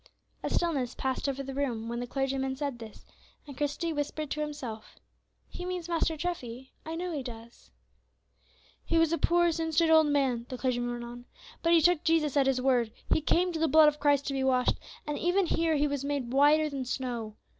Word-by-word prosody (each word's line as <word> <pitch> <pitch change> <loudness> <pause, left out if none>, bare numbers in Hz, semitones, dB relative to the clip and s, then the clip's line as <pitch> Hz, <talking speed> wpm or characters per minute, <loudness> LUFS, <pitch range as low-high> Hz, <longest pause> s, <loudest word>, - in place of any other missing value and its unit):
A - - -2
stillness 275 -8 0
passed 265 +1 -2
over 275 0 -3
the 270 0 -6
room 245 -5 -2
when 235 +1 -3
the 245 - -4
clergyman 270 0 -1
said 275 -3 -4
this, 220 -2 -11 0.4
and 285 -2 -10
Christie 295 +4 -2
whispered 290 0 -3
to 300 - -2
himself, 275 -8 -6 0.5
"He 360 - -8
means 360 -2 -4
Master 330 -2 0
Treffy, 265 -7 -5
I 320 +1 -5
know 355 +1 -3
he 300 -4 -3
does." 235 - -11 1.1
"He 335 - 0
was 330 0 +3
a 335 - 0
poor 345 0 +3
sin 325 0 -2
stained 325 +1 +3
old 315 -1 +6
man," 265 -5 +1
the 255 - -5
clergyman 245 -1 -1
went 240 0 -5
on, 240 +1 -9 0.4
"but 335 0 +3
he 335 - +6
took 350 0 +3
Jesus 320 -3 +2
at 275 -2 +3
His 265 -1 +2
word, 250 -3 +2 0.2
he - - +3
came 355 +4 +2
to 325 - -3
the 325 - +2
blood 315 -1 +7
of 300 0 -7
Christ 285 -1 +3
to 280 - -2
be 270 -1 -1
washed, 255 -1 +2 0.3
and 295 -1 -3
even 355 +3 +2
here 330 -1 +1
he 295 0 +2
was 285 -1 -3
made 280 -4 -2
whiter 295 +3 +5
than 275 -3 -4
snow. 240 -4 -4
285 Hz, 210 wpm, -29 LUFS, 255-320 Hz, 1.1 s, blood